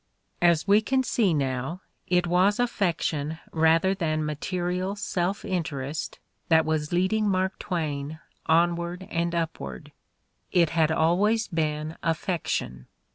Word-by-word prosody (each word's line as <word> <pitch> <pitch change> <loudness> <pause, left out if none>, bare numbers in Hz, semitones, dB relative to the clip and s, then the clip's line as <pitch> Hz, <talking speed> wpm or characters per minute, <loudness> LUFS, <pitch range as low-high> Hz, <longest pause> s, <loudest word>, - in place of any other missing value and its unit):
As 170 0 +3
we 205 +2 +6
can 260 +4 +1
see 220 -6 +2
now, 135 +3 -2 0.3
it 180 -1 +2
was 185 +5 +3
affection 165 -9 0
rather 165 +3 +3
than 155 -5 -1
ma 150 - -1
terial 180 +5 -2
self 190 -1 -2
interest 155 -5 -3 0.3
that 160 -1 +5
was 155 -1 -1
leading 190 +4 +2
Mark 190 0 0
Twain 155 -3 -3 0.3
on 170 +2 +4
ward 175 +2 -5
and 170 0 -1
upward. 110 - -4 0.6
It 170 -3 +3
had 160 -2 +2
always 200 +8 +2
been 155 -2 -2
affection 165 - -2
170 Hz, 130 wpm, -26 LUFS, 155-185 Hz, 0.6 s, we